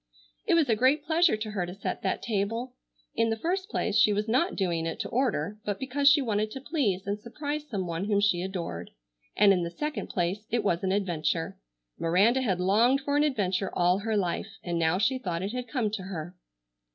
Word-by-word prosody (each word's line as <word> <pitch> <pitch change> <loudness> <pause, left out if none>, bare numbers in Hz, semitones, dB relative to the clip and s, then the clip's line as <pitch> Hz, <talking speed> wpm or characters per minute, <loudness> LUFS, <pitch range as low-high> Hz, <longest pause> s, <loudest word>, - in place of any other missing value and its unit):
It - - +4
was 325 -4 +3
a 225 - +3
great 260 +6 +2
pleasure 325 -5 +3
to 215 0 -5
her 195 -4 -1
to 175 +1 -6
set 200 - -4
that 190 - -2
table. 230 +3 -2 0.4
In 225 0 +2
the 225 - -1
first 370 - -2
place 215 - -1
she 210 - +5
was 210 +1 -1
not 265 +12 +1
doing 170 -4 -1
it 165 - -4
to 205 - -4
order 210 - -1
but 205 -1 -2
because 280 +2 +3
she 290 -1 +4
wanted 215 -2 0
to 265 - -7
please 255 - -1
and 200 +1 -2
surprise 290 +6 -5
some 195 -5 -2
one 170 +2 -3
whom 205 -1 +2
she 200 -4 +2
adored, 170 - -5 0.5
and 200 -1 +6
in 180 - +1
the 170 - -2
second 300 - -4
place 185 +4 -2
it 235 -1 0
was 175 -3 0
an 190 - +1
adventure. 175 -4 -1 0.4
Miranda 200 +10 +3
had 190 -8 0
longed 225 +9 +3
for 285 +1 -1
an 295 - +4
adventure 195 -9 0
all 180 +2 +3
her 220 +1 -1
life 195 +2 -2
and 170 -1 -2
now 165 +2 +2
she 250 +6 +1
thought 175 -6 -3
it 200 - -2
had 250 0 -4
come 235 -7 -1
to 210 -2 -3
her. 180 -2 -6
210 Hz, 220 wpm, -28 LUFS, 185-255 Hz, 0.5 s, and